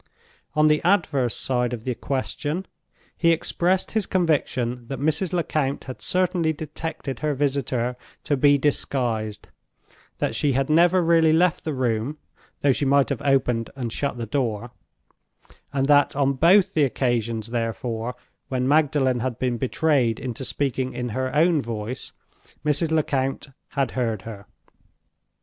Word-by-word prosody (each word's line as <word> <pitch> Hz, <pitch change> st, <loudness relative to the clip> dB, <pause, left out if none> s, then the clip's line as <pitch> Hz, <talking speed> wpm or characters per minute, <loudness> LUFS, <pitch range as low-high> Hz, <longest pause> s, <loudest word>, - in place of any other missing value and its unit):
On 150 Hz, 0 st, +5 dB
the 150 Hz, 0 st, +3 dB
adverse 155 Hz, -, +2 dB
side 125 Hz, -1 st, 0 dB
of 115 Hz, -2 st, -5 dB
the 125 Hz, -, -1 dB
question, 145 Hz, +7 st, -3 dB, 0.5 s
he 170 Hz, -1 st, +3 dB
expressed 175 Hz, +3 st, 0 dB
his 220 Hz, -3 st, 0 dB
conviction 130 Hz, -9 st, 0 dB
that 135 Hz, -, -5 dB
Mrs. 155 Hz, +5 st, 0 dB
Lecount 155 Hz, -5 st, -1 dB
had 130 Hz, -1 st, -8 dB
certainly 180 Hz, -3 st, +1 dB
detected 155 Hz, -2 st, -6 dB
her 150 Hz, -2 st, -1 dB
visitor 130 Hz, -3 st, -1 dB, 0.3 s
to 145 Hz, -, +1 dB
be 145 Hz, +1 st, +5 dB
disguised; 120 Hz, -6 st, -1 dB, 0.7 s
that -, -, -1 dB
she 145 Hz, -2 st, +1 dB
had 135 Hz, +3 st, 0 dB
never 175 Hz, +3 st, +5 dB
really 165 Hz, -1 st, +4 dB
left 170 Hz, +1 st, +2 dB
the 155 Hz, -, -2 dB
room, 125 Hz, +3 st, -1 dB, 0.4 s
though 140 Hz, -, +4 dB
she 135 Hz, -, -1 dB
might 140 Hz, 0 st, +3 dB
have 140 Hz, -5 st, -2 dB
opened 125 Hz, -4 st, +1 dB
and 120 Hz, -4 st, -4 dB
shut 140 Hz, -3 st, -2 dB
the 115 Hz, -, -3 dB
door; 120 Hz, -2 st, -2 dB, 1.0 s
and 135 Hz, -1 st, 0 dB
that 145 Hz, 0 st, +4 dB
on 140 Hz, -1 st, +2 dB
both 175 Hz, +8 st, +4 dB
the 155 Hz, -, +3 dB
occasions, 115 Hz, -4 st, -1 dB
therefore, 115 Hz, +1 st, -3 dB, 0.3 s
when 130 Hz, -1 st, -1 dB
Magdalen 140 Hz, -4 st, +2 dB
had 120 Hz, -1 st, -2 dB
been 125 Hz, -2 st, -1 dB
betrayed 130 Hz, -4 st, +1 dB
into 125 Hz, 0 st, -5 dB
speaking 130 Hz, -1 st, -2 dB
in 125 Hz, 0 st, -3 dB
her 130 Hz, +4 st, -2 dB
own 160 Hz, 0 st, +4 dB
voice, 115 Hz, +2 st, -5 dB, 0.5 s
Mrs. 150 Hz, +2 st, +2 dB
Lecount 140 Hz, -3 st, 0 dB, 0.2 s
had 135 Hz, -2 st, -1 dB
heard 115 Hz, -6 st, -2 dB
her. 105 Hz, -3 st, -9 dB
135 Hz, 145 wpm, -24 LUFS, 120-155 Hz, 1.0 s, On